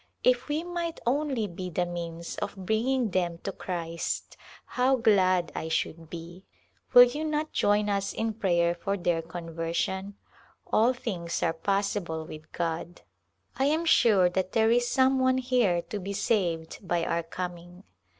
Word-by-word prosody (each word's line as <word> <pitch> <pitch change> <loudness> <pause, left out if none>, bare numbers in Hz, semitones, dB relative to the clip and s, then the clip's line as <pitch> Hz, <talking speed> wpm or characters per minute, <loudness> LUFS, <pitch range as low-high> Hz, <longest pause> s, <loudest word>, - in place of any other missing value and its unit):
If 250 -1 +3
we 305 +2 -1
might 345 -1 -4
only 265 -2 0
be 185 -1 -6
the 180 +1 0
means 170 -1 -5
of 205 0 -4
bringing 220 +5 0
them 175 -2 0
to 195 - -2
Christ 170 -3 -4 0.3
how 255 +2 +2
glad 185 -7 +3
I 160 - -4
should 160 0 -2
be! 170 +2 -9 0.5
Will 245 - +11
you 250 +5 0
not 305 0 -1
join 205 0 +2
us 200 -1 0
in 225 0 -2
prayer 175 -5 +2
for 195 +4 -2
their 175 -2 0
conversion? 170 +4 -3 0.5
All 235 +4 +3
things 175 -9 -3
are 165 - +2
possi 200 +4 0
ble 160 -1 -5
with 155 0 -11
God. 170 0 -3 0.6
I 270 - +3
am 315 +4 +1
sure 210 - +5
that 185 +1 -2
there 225 0 +4
is 240 0 +3
some 260 +1 +3
one 260 0 +3
here 245 -9 +2
to 205 +5 -5
be 200 +1 -5
saved 175 -7 -1
by 175 -3 -1
our 170 - 0
coming. 175 +1 -7
190 Hz, 160 wpm, -28 LUFS, 170-240 Hz, 0.6 s, Will